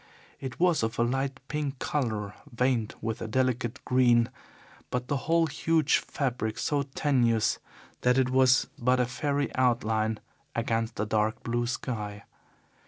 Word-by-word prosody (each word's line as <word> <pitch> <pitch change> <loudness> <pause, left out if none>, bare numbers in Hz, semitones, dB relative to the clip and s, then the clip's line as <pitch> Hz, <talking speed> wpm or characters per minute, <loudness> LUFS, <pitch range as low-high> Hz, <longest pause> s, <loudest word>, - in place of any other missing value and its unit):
It 130 -3 -6
was 175 -3 +3
of 110 +1 -2
a 115 - +3
light 135 +2 -1
pink 145 -2 -3
colour 110 -8 -2 0.2
veined 120 -2 0
with 115 +1 -3
a 115 - -3
delicate 125 0 0
green, 120 -2 +4 0.6
but 125 0 -2
the 145 - 0
whole 165 0 +4
huge 155 0 +2
fabric 120 -6 -2
so 145 -1 0
tenuous 120 -6 +2 0.4
that 125 +1 +3
it 130 -1 +2
was 130 0 +5
but 125 +1 +3
a 125 - +3
fairy 140 +3 -1
outline 110 -3 +1 0.4
against 115 0 -1
the 105 - -1
dark 110 +1 0
blue 120 0 -1
sky. 105 -5 -4
125 Hz, 145 wpm, -28 LUFS, 115-135 Hz, 0.6 s, was